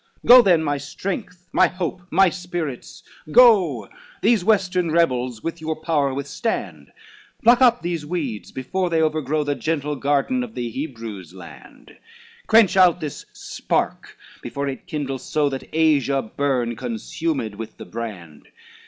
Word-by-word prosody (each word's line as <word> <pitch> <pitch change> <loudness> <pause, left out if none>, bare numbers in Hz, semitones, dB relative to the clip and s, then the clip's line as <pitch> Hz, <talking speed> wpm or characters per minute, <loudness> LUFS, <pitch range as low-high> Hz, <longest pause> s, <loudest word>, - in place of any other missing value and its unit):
XVI - - -26
"Go 250 +1 +11
then, 175 -7 +3
my 145 -2 -1
strength, 180 - -6
my - - +5
hope, 180 0 -4
my 195 - +4
Spirits 175 -7 -6 0.3
go, 185 - +5 0.4
These 220 -3 +3
western 185 -4 +1
rebels 125 -8 0
with 165 0 -5
your 160 0 -2
power 155 -3 0
withstand, 130 - -4 0.5
Pluck 240 +2 +5
up 245 -4 +4
these 170 -3 -3
weeds, 150 -9 -4
before 180 +8 -2
they 165 -1 +1
overgrow 155 -1 0
The 145 0 -1
gentle 150 -1 -2
garden 145 - 0
of 235 -2 -9
the 120 -1 -4
Hebrews' 115 - -7
land, 85 -3 -14 0.5
Quench 220 -4 +5
out 180 -2 +5
this 150 -4 -7
spark, - - -3 0.2
before 140 0 -4
it 135 - -6
kindles 135 -4 -4
so 150 -2 0
That 135 -1 -7
Asia 145 -4 +2
burn, 125 -4 0
consumed 160 - -3
with 110 +2 -9
the - - -9
brand. 95 -10 -8
155 Hz, 145 wpm, -22 LUFS, 130-180 Hz, 0.5 s, Go